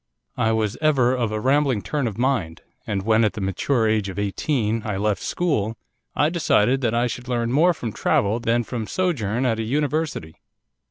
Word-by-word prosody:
I 110 - +2
was 110 -1 -1
ever 135 -5 +3
of 120 -4 -1
a 110 - -2
rambling 135 -2 +2
turn 145 -4 -1
of 110 - -5
mind, 120 -11 -1 0.2
and 100 -2 -2
when, 110 +2 +3
at 105 - +1
the 110 - -6
mature 110 +5 0
age 110 -2 +1
of 95 - -8
eighteen, 110 +2 -1
I 105 -3 -3
left 105 -2 0
school, 115 - -1 0.4
I 150 +2 +3
decided 135 -6 +2
that 115 -2 0
I 120 +1 +2
should 125 +1 -5
learn 120 -2 -1
more 160 +7 +4
from 115 -7 -4
travel 105 +3 +1
than 120 +1 +1
from 115 -2 -5
sojourn 130 - -1
at 115 -3 +1
a - - -1
university. 145 - -2
115 Hz, 195 wpm, -23 LUFS, 105-135 Hz, 0.4 s, more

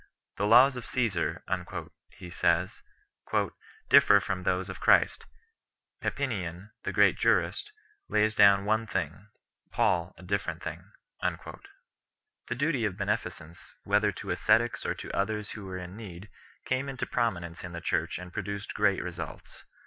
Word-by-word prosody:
"The 100 - +1
laws 130 +5 +7
of 125 - -6
Csesar," 100 -11 -1 0.7
he 90 - -11
says 85 +1 +1 0.5
3, - - +1 0.4
"differ 100 - +7
from 95 -2 -3
those 90 0 0
of 95 - -7
Christ; - - +3 0.7
Papinian 100 -7 -3
[the - - -3
great - - +4
jurist] 425 - +1 0.4
lays 110 +1 +2
down 100 -2 +6
one 110 +2 +1
thing, 95 +1 -3 0.4
Paul 85 -1 +1
a - - -13
different 90 -3 -2
thing." - - -7 0.3
The 120 - -8
duty 140 -2 0
of 100 -4 -1
beneficence, 90 -4 -4
whether - - +2
to - - -6
ascetics - - +2
or - - -1
to - - -7
others 105 +1 -1
who 105 - -8
were 95 -1 -5
in 90 +1 -8
need, 100 -2 -10 0.3
came 130 +2 -1
into 135 - -3
prominence 85 -8 -2
in 90 -1 -7
the 85 - -4
Church - - -1
and 90 -1 -9
produced 100 0 -4
great 100 -2 +2
results. 90 -2 -8
100 Hz, 145 wpm, -29 LUFS, 90-110 Hz, 0.7 s, laws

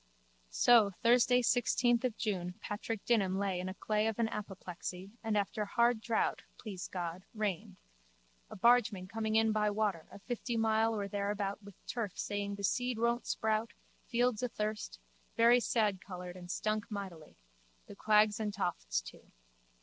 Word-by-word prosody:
So 220 - +5
Thursday 245 +1 +5
sixteenth 240 0 +2
June 180 -5 -2
Patk. 210 +1 -4
Dignam 195 -6 +2
laid 195 -2 -1
in 185 +1 -3
clay 215 +1 0
of 225 - -2
an 230 -1 +1
apoplexy 190 -2 -6
and 220 -1 0
after 205 +2 -1
hard 235 +2 +2
drought, 225 0 0 0.2
please 195 -5 -6
God, 175 0 -5
rained, 205 -5 -3 0.7
a - - -9
bargeman 215 -4 +3
coming 220 +1 -2
in 220 0 +4
by 210 -1 +2
water 205 -6 -1
a - - -10
fifty 240 +3 -4
mile 225 0 +2
or 200 -2 -2
thereabout 200 0 -2
with 200 -2 -13
turf 225 -6 -4
saying 200 0 -2
the 200 - -8
seed 245 +4 0
won't 235 +1 0
sprout, 220 +1 0 0.3
fields 245 -2 +1
athirst, 215 - -3 0.4
very 235 +2 +6
sadcoloured 190 -6 -1
and 175 -1 -10
stunk 215 +2 -1
mightily, 190 -7 -7 0.5
the - - -11
quags 210 0 +3
and 210 -2 -2
tofts - - -1
too. - - -13
210 Hz, 150 wpm, -33 LUFS, 195-225 Hz, 0.7 s, very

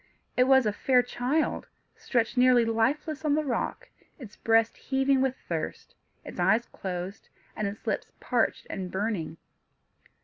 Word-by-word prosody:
It 250 - +4
was 265 -1 +5
a 210 - +1
fair 250 +4 +3
child, 250 +5 -1 0.3
stretched 240 -1 -1
nearly 250 -1 +5
lifeless 275 +8 0
on 295 -2 +2
the 310 - +1
rock, 245 -4 -2 0.3
its 235 -8 -11
breast 225 0 +2
heaving 270 0 +1
with 265 -1 +1
thirst, - - -4 0.3
its - - -8
eyes 235 +2 +3
closed, 185 +2 -6 0.3
and 215 - -1
its 200 +3 -7
lips 215 - -2
parched 240 -2 0
and 185 -2 -5
burning. 190 -5 -2
240 Hz, 145 wpm, -28 LUFS, 215-265 Hz, 0.3 s, was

